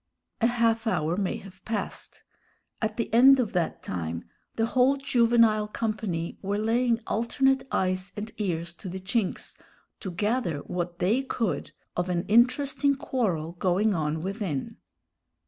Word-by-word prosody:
A 230 - +5
half 230 -1 +1
hour 165 -5 +1
may 195 -1 -1
have 185 -1 -13
passed. 220 -2 -5 0.6
At 220 -1 -1
the 230 -2 -2
end 265 +3 +8
of 230 -5 0
that 175 -3 -1
time 85 -1 -4 0.3
the 225 - +2
whole 255 +4 +3
juvenile 230 -5 +3
company 210 -6 -3
were 200 +1 -1
laying 230 +2 +1
alternate 265 +4 +1
eyes 185 0 0
and 215 +2 -5
ears 170 -4 -2
to 190 - -7
the 190 +2 -5
chinks, 195 +2 -2 0.4
to 195 - -5
gather 185 - -1
what 175 +1 -4
they 210 +9 +2
could 235 -6 -2 0.2
of 175 +1 -1
an 175 -1 0
interesting 270 +5 +3
quarrel 190 - -1
going 195 +4 +2
on 155 -2 -1
within. 190 - -3
210 Hz, 145 wpm, -27 LUFS, 180-235 Hz, 0.6 s, end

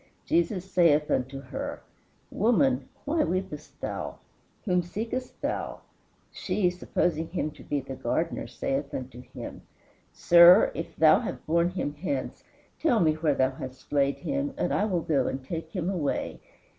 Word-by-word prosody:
"Jesus 170 +2 +1
saith 165 -6 +3
unto 130 +2 -1
her, 130 - -5 0.5
Woman, 250 +4 +2 0.2
why 305 +2 +2
weepest 160 - -4
thou? - - -4 0.5
whom 180 -3 +2
seekest 225 +8 -5
thou? - - -3 0.5
She, 180 -4 0
supposing 170 -2 -1
him 160 -4 -2
to - - -14
be 145 -1 -1
the 135 0 -7
gardener, - - -2
saith 140 +1 -3
unto 125 -1 -6
him, 125 -1 -9 0.5
Sir, 175 +3 +7
if 165 - -6
thou 155 -1 +6
have - - -6
borne 170 +2 +2
him 180 -5 -3
hence, 140 -8 -3 0.4
tell 250 -9 +3
me 160 -4 +4
where 155 -2 +1
thou 130 0 +2
hast 130 -1 -9
laid 140 -1 +2
him, 280 0 -2
and - - 0
I 205 - +2
will 185 -5 0
go 145 -6 +1
and 130 0 -4
take 160 +2 -5
him 175 -1 -3
away. 175 -7 -2
165 Hz, 155 wpm, -27 LUFS, 140-190 Hz, 0.5 s, Sir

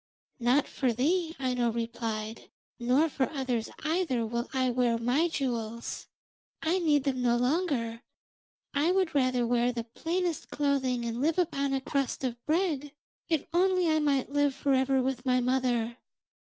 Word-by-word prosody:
'Not 250 +4 +3
for 260 -3 0
thee,' 325 +8 0
Aino 250 -3 +1
replied, 225 -1 -4 0.3
'nor 255 +7 +3
for 270 -4 -1
others 255 -6 -2
either, 310 -8 0
will 235 +2 -3
I 260 -2 +1
wear 240 -1 +2
my 250 +8 +2
jewels. 235 -7 -3 0.6
I 335 +4 +2
need 300 -5 +3
them 265 -3 -1
no 240 -1 +3
longer; 250 -4 0 0.7
I 295 +5 +2
would 375 -2 +1
rather 255 -3 +2
wear 240 +1 +2
the 235 -1 -4
plainest 335 +8 -2
clothing 265 -4 0
and 235 +1 -3
live 315 +4 +1
upon 280 -6 +1
a 265 - -1
crust 275 0 -2
of 240 -2 -3
bread, 305 -4 0 0.4
if 320 -4 +1
only 365 0 +3
I 310 - +3
might 280 -3 +1
live 290 -1 +2
for 275 0 +1
ever 265 0 +2
with 265 -1 -2
my 255 -1 +2
mother.' 245 -2 0
265 Hz, 155 wpm, -29 LUFS, 240-300 Hz, 0.7 s, Not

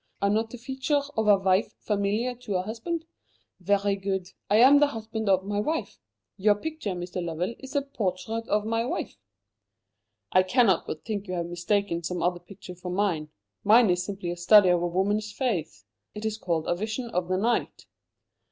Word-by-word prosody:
Are 200 0 +2
not 220 +2 +1
the 245 - -8
features 270 +3 -1
of 220 -1 0
a 205 -1 +7
wife 190 +1 +1
familiar 210 +4 -1
to 240 -5 -5
a 180 - +1
husband? 275 - -4 0.5
Very 200 +2 +1
good. 190 -2 -3 0.2
I 205 - +3
am 265 +6 +7
the 295 - +5
husband 220 -4 -4
of 190 -1 +3
my 205 0 -1
wife. 315 +9 -2 0.4
Your 205 +1 +4
picture, 305 -3 -4
Mr. 180 0 -4
Lovell, 170 +5 -2
is 265 +2 -10
a 285 - +2
portrait 225 -3 -3
of 210 0 +1
my 225 +1 0
wife." 235 - -4 1.1
"I 185 - +6
cannot 195 -1 +3
but 155 - -6
think 210 -3 -4
you 185 - -3
have 170 -1 -2
mistaken 175 +1 -1
some 175 +1 -3
other 175 0 +1
picture 185 +1 -11
for 180 +1 -8
mine. 180 -5 0 0.3
Mine 220 0 +6
is 180 0 +1
a - - -4
simple 190 -3 -4
study 185 +2 +6
of 175 -1 +3
a 175 - +1
woman's 205 +4 0
face. 205 - -3 0.3
It 210 +1 -6
is 220 0 -2
called 165 -5 -1
'A 175 - 0
Vision 220 +4 -4
of 180 -3 -1
the 185 0 0
Night.'" 230 +5 -1
205 Hz, 190 wpm, -27 LUFS, 180-225 Hz, 1.1 s, a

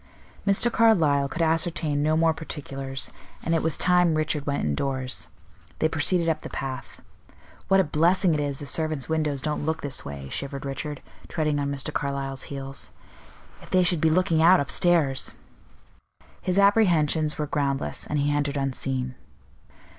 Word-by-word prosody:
Mr. 200 +4 +4
Carlyle 160 -13 +3
could 165 +4 -1
ascertain 160 -2 0
no 155 +1 +2
more 165 0 +3
particulars, 135 -4 -4 0.3
and 165 - 0
it 165 - +2
was 160 -2 -1
time 180 -2 +3
Richard 155 -2 -1
went 140 0 -1
indoors. 130 - -2 0.5
They 160 - +2
proceeded 165 +2 +1
up 160 -1 0
the - - -7
path. 135 -1 -6 0.7
"What 195 0 +4
a - - +5
blessing 170 +3 +2
it 150 - 0
is 145 -2 -2
the 145 - -7
servants' 155 -1 -2
windows 155 -4 -1
don't 150 -1 -2
look 160 +1 -1
this 140 -2 -2
way," 70 -1 -7
shivered 140 - -4
Richard, 140 +1 -5 0.2
treading 155 -3 0
on 140 0 -1
Mr. 140 -1 -2
Carlyle's 135 -1 -3
heels. 135 -1 -5 0.7
"If - - -14
they 185 0 +4
should 175 -2 +3
be 160 - +4
looking 165 -1 +2
out 180 +3 +7
upstairs!" 140 -1 +1 1.1
His 185 0 -1
apprehensions 170 -7 +3
were 150 - -1
groundless, 140 -2 -2
and 150 - -1
he 145 0 +1
entered 145 0 -1
unseen. 130 -1 -2
150 Hz, 160 wpm, -25 LUFS, 140-165 Hz, 1.1 s, out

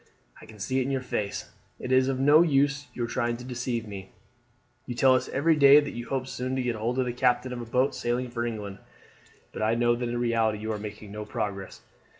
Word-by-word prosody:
"I - - -13
can 110 - -13
see 130 +6 -1
it 130 - 0
in - - -2
your 135 -1 -1
face. 105 -5 -3 0.3
It 125 - -5
is 130 0 +4
of 135 -1 -1
no 145 +4 +6
use 145 -2 +2
your 120 - -1
trying 120 0 -1
to 125 - -10
deceive 120 -2 -3
me. 95 -2 -8 0.8
You 120 - -4
tell 130 +2 +5
us 130 - 0
every 160 +4 +2
day 140 0 +8
that 145 -1 -3
you 120 0 -7
hope 135 -1 -1
soon 130 0 -3
to 130 - -1
get 120 -2 -1
hold 115 +3 -2
of 130 - +2
the 120 - -2
captain 125 0 +1
of 120 - -5
a - - -6
boat 125 +4 +1
sailing 120 +1 -2
for 120 -1 -2
England; 105 -4 -5 0.7
but - - -7
I 110 +1 +2
know 120 0 +3
that 120 0 -3
in 120 - -2
reality 115 -2 +1
you 110 +1 -4
are 105 - -3
making 105 0 -8
no 105 +1 -5
progress. 105 -3 -5
120 Hz, 240 wpm, -27 LUFS, 110-130 Hz, 0.8 s, day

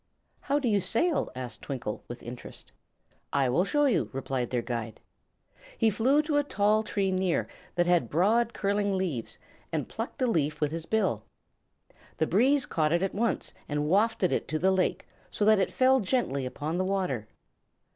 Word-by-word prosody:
"How 285 +1 0
do 280 -4 -1
you 205 -3 +3
sail?" 240 - +1
asked 125 -4 -6
Twinkle, 125 -6 -5
with 120 0 -8
interest. 120 +1 -9 0.6
"I 135 -2 +2
will 150 +9 +3
show 295 +7 +2
you," 225 - +1
replied 130 -2 -2
their 120 -2 -1
guide. 115 -2 -4 0.8
He 225 -1 +3
flew 265 +8 +3
to 300 -1 0
a 290 - +3
tall 210 -5 +2
tree 200 -3 -1
near, 185 -2 0 0.3
that 175 0 +3
had 175 -9 +2
broad, 220 +8 +2
curling 200 -2 0
leaves, 160 -12 -3 0.3
and - - -2
plucked - - -6
a - - +4
leaf 155 - 0
with 150 -1 0
his 165 0 -5
bill. 190 - 0 0.9
The 160 - +2
breeze 255 - +3
caught 155 -2 0
it 170 +2 +2
at 195 - -1
once 230 +3 -1 0.2
and 150 0 -1
wafted 205 +2 +2
it - - -1
to 155 - -1
the 190 +4 +3
lake, 190 -1 0 0.2
so 205 - -1
that 215 -1 +5
it 190 - +1
fell 260 +1 +4
gently 185 - 0
upon 155 +6 -3
the 185 - +1
water. 185 - -1
185 Hz, 180 wpm, -28 LUFS, 145-220 Hz, 0.9 s, that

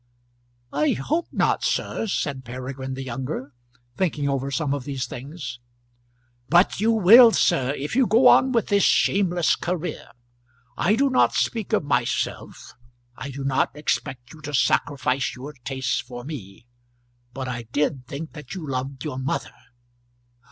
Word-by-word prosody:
"I 150 +1 +2
hope 315 - -1
not, - - +1
sir," 225 - -1
said 140 -8 -2
Peregrine 130 +2 -6
the 135 - -5
younger, 130 +2 -5 0.4
thinking 150 -6 0
over 135 -1 -1
some 140 0 -1
of 140 -2 -3
these 135 -2 -3
things. 130 -2 -7 0.9
"But 175 +4 +4
you 220 +3 +2
will, 225 +3 +8
sir, 135 +1 +2
if 145 +9 -4
you 260 -2 +4
go 235 +4 +5
on 260 - +6
with 230 -4 0
this 200 0 +3
shameless 180 -4 +3
career. 175 0 -4 0.7
I 195 +10 +2
do 275 +3 +2
not 255 - +3
speak 225 -4 -1
of - - +2
myself. 125 -4 -2 0.4
I 135 - -7
do 135 0 -6
not 135 +1 0
expect 135 -4 -3
you 155 - -14
to 150 0 -4
sacrifice 135 0 +1
your 135 +4 -8
tastes 130 -2 -1
for 120 0 -8
me; 115 -7 -9 0.7
but 130 0 -5
I 120 -2 -5
did 140 -2 -1
think 155 +4 -7
that 150 +1 -9
you 170 -5 -6
loved 130 0 -4
your 130 -4 -4
mother!" 130 +1 -3
140 Hz, 150 wpm, -24 LUFS, 130-175 Hz, 0.9 s, will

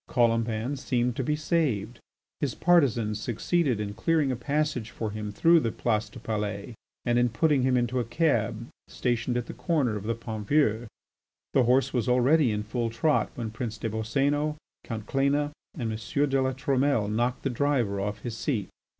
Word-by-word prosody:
Colomban 115 +2 +1
seemed 125 -3 0
to 135 - -1
be 150 +4 0
saved; 140 - -1 0.4
his 145 -4 -1
partisans 120 - +2
succeeded 125 - 0
in 100 -1 -3
clearing 155 +2 +1
a - - -1
passage 140 -2 -1
for 110 -3 -4
him 105 0 -5
through 165 +10 +5
the 115 -7 -1
Place 110 -2 -1
du - - -12
Palais 105 0 -3 0.3
and 120 0 +3
in 120 0 +3
putting 145 +4 +2
him 130 0 +3
into 125 +1 0
a - - +1
cab 120 -4 0 0.2
stationed 120 0 -1
at 120 - -2
the - - -7
corner 125 -1 0
of 105 0 -5
the 115 +1 0
Pont 110 -2 -6
Vieux. 120 -6 +2 0.7
The 130 - +4
horse 130 +3 +3
was 125 -3 0
already 130 +3 +4
in 105 0 -2
full 115 +2 -2
trot 145 +7 +1
when 115 -3 -4
Prince 110 -1 -4
des 110 - -3
Boscénos, 140 +7 0 0.3
Count 110 -3 -5
Cléna, 140 +3 +1 0.3
and 115 -5 -2
M. 115 +7 -1
de 135 0 +2
La 130 0 0
Trumelle 135 -3 +1
knocked 120 +4 -1
the 135 - 0
driver 120 -7 0
off 105 +1 -3
his 120 -1 -5
seat. 115 - -2
120 Hz, 185 wpm, -27 LUFS, 110-140 Hz, 0.7 s, through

